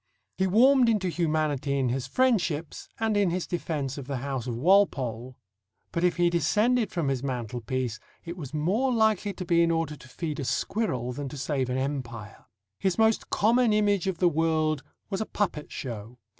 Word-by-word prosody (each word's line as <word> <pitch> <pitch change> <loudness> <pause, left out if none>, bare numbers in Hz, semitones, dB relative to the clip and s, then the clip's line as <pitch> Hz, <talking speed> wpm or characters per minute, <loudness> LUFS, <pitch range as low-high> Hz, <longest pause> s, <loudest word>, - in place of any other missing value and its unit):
He 190 - +1
warmed 250 +5 +5
into 205 -5 +1
humanity 155 -5 0
in 130 -2 +1
his 130 +1 -2
friendships 175 - 0
and 220 -1 +1
in 200 -3 +3
his 180 +1 -2
defence 145 -6 -3
of 130 - -8
the 140 -2 -2
house 130 -1 -4
of 120 - -2
Walpole; 130 - +2 0.5
but 170 - -2
if 180 - +3
he 175 0 +4
descended 210 - +2
from 170 -5 -1
his 135 -2 0
mantelpiece, 125 -2 -3 0.3
it 170 0 -5
was 150 -8 -7
more 190 - +1
likely 220 -3 +2
to 185 - -6
be 170 -1 +3
in 170 - +3
order 165 -2 0
to 130 - -15
feed 155 +2 -4
a - - -2
squirrel 130 - -1
than 140 +1 -5
to 145 - -8
save 135 -1 -1
an 125 - -1
empire. 125 -6 -5 0.3
His 190 -2 0
most 220 0 +2
common 230 +1 +3
image 205 -3 +2
of 190 -3 -1
the 180 - +3
world 155 -2 +1 0.3
was 195 - -1
a 220 - -2
puppet 175 -7 -2
show. 115 -1 -6
160 Hz, 185 wpm, -27 LUFS, 130-195 Hz, 0.5 s, warmed